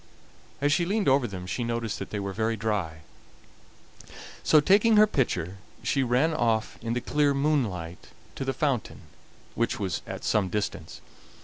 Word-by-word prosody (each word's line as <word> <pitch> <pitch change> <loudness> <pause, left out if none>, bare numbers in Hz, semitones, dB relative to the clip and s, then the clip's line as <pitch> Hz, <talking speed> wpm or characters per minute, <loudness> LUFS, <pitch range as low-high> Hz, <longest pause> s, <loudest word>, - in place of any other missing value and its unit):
As 145 0 +3
she 175 - +2
leaned 200 +3 0
over 135 -2 +4
them 95 -2 -7
she 105 +7 -3
noticed 115 -2 -2
that 100 - -6
they 105 - -3
were 100 -1 -4
very 110 +2 -1
dry. 100 -8 -2 1.4
So 155 - +5
taking 205 +8 +4
her 210 - +8
pitcher, 100 - -1 0.3
she 135 - +1
ran 130 +6 +2
off 115 -6 0
in 115 0 -2
the 125 - -1
clear 145 +1 +1
moonlight 115 - -1 0.3
to - - -5
the 135 - 0
fountain, 135 -3 -2 0.5
which 115 - -1
was 95 -4 -2
at - - -6
some 100 -3 +1
distance. 105 +2 -4
115 Hz, 165 wpm, -27 LUFS, 100-145 Hz, 1.4 s, her